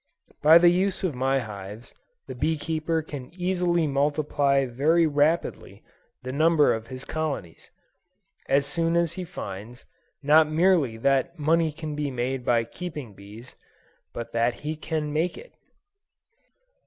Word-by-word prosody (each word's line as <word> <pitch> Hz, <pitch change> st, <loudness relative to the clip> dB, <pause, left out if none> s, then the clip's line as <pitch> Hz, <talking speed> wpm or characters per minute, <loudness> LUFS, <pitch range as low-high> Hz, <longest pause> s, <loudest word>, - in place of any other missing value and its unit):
By 155 Hz, +2 st, +8 dB
the 175 Hz, 0 st, +6 dB
use 190 Hz, +2 st, 0 dB
of 180 Hz, -5 st, 0 dB
my 135 Hz, +2 st, +1 dB
hives, 105 Hz, -1 st, -7 dB, 0.3 s
the -, -, -7 dB
bee 155 Hz, +6 st, -1 dB
keeper 160 Hz, +1 st, -2 dB
can 140 Hz, -4 st, -8 dB
easily 180 Hz, -2 st, 0 dB
multiply 140 Hz, -1 st, +1 dB
very 150 Hz, +7 st, +2 dB
rapidly, 150 Hz, +2 st, 0 dB, 0.4 s
the 130 Hz, -, -5 dB
number 155 Hz, +2 st, +3 dB
of 110 Hz, 0 st, -5 dB
his 130 Hz, 0 st, -8 dB
colonies, 145 Hz, -, -5 dB, 0.8 s
as 140 Hz, +1 st, +3 dB
soon 165 Hz, +3 st, 0 dB
as 170 Hz, -1 st, +1 dB
he 185 Hz, -, -5 dB
finds, 120 Hz, -, -8 dB, 0.4 s
not 155 Hz, +2 st, +5 dB
merely 155 Hz, -7 st, +2 dB
that 135 Hz, +7 st, +1 dB
money 160 Hz, +1 st, +2 dB
can 155 Hz, 0 st, -6 dB
be 150 Hz, -1 st, -2 dB
made 125 Hz, 0 st, -3 dB
by 120 Hz, -1 st, +2 dB
keeping 150 Hz, -, -8 dB
bees, 105 Hz, +5 st, -13 dB, 0.6 s
but 120 Hz, -, -7 dB
that 115 Hz, +1 st, 0 dB
he 155 Hz, +1 st, -2 dB
can 155 Hz, -1 st, -3 dB
make 165 Hz, +4 st, -1 dB
it. -, -, -13 dB
150 Hz, 140 wpm, -25 LUFS, 130-165 Hz, 0.8 s, By